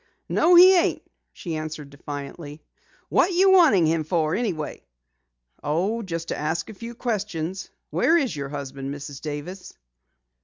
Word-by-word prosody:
"No, 350 +2 +4
he 370 +2 +9
ain't," 345 - +1 0.3
she 170 -3 -6
answered 155 -2 -6
defiantly. 145 +2 -8 0.5
"What 370 - +3
you 380 +2 +5
wanting 310 - +6
him 160 0 +1
for 160 -1 0
anyhow?" 185 -10 -2 0.8
"Oh, 185 +10 -1
just 165 -5 -5
to - - -1
ask 160 +6 -2
a - - -10
few 230 +3 -9
questions. 195 -6 -3 0.2
Where 335 - +3
is 275 - -1
your 140 -1 -5
husband, 140 -1 -6
Mrs. 140 -1 -8
Davis?" 155 +5 -7
165 Hz, 145 wpm, -24 LUFS, 150-230 Hz, 0.8 s, he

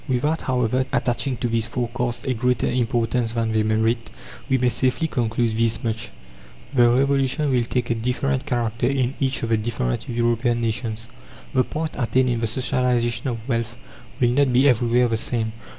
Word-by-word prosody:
Without, 145 +5 0
however, 125 0 +1
attaching 125 +1 0
to 120 - -1
these 115 -1 +1
forecasts 120 +1 -3
a 130 -2 0
greater 125 0 0
importance 120 -1 0
than 115 -1 0
they 110 0 +2
merit, 110 +2 0 0.4
we 130 - +3
may 125 0 +1
safely 130 +7 +1
conclude 115 -4 0
this 115 -1 +1
much: 110 -1 -2 0.6
the 120 -3 +5
Revolution 135 +3 +2
will 125 -2 +2
take 125 0 -1
a - - +4
different 130 +4 -1
character 120 -3 0
in 130 -1 0
each 135 -2 0
of 115 - -1
the 115 - +3
different 105 - -2
European 120 0 +1
nations; 115 -1 -2 0.5
the 130 - +3
point 155 +3 -4
attained 125 +1 +1
in 120 -1 0
the 115 - 0
socialization 125 0 0
of 115 -2 -4
wealth 115 -2 -2 0.4
will 120 -1 +3
not 135 +1 +3
be 130 +3 +4
everywhere 120 -1 +3
the 115 -1 0
same. 110 -1 -1
120 Hz, 175 wpm, -23 LUFS, 115-130 Hz, 0.6 s, the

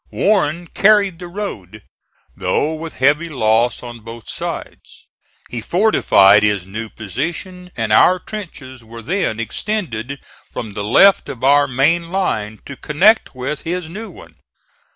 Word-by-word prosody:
Warren 175 -5 +1
carried 200 -1 +3
the 175 - -8
road, 110 - -7 0.5
though 155 - 0
with 160 +1 -7
heavy 150 +5 +2
loss 120 -3 +1
on 120 -1 -8
both 115 0 -11
sides. - - -7 0.4
He 120 - -6
fortified 110 - +4
his 105 -3 +1
new 110 +4 -6
position, 175 - -5
and 110 -2 0
our 185 +10 +6
trenches 155 - -9
were 115 +1 -11
then 175 - -1
extended 135 - -4 0.3
from 110 -3 -6
the 100 +1 -5
left 190 - +4
of 125 - -8
our 145 +1 +4
main 160 +6 +1
line 110 - -2
to 140 - -8
connect 185 - +2
with 135 +4 -4
his 170 0 -4
new 215 +6 -7
one. 475 - -15
140 Hz, 140 wpm, -18 LUFS, 115-180 Hz, 0.5 s, our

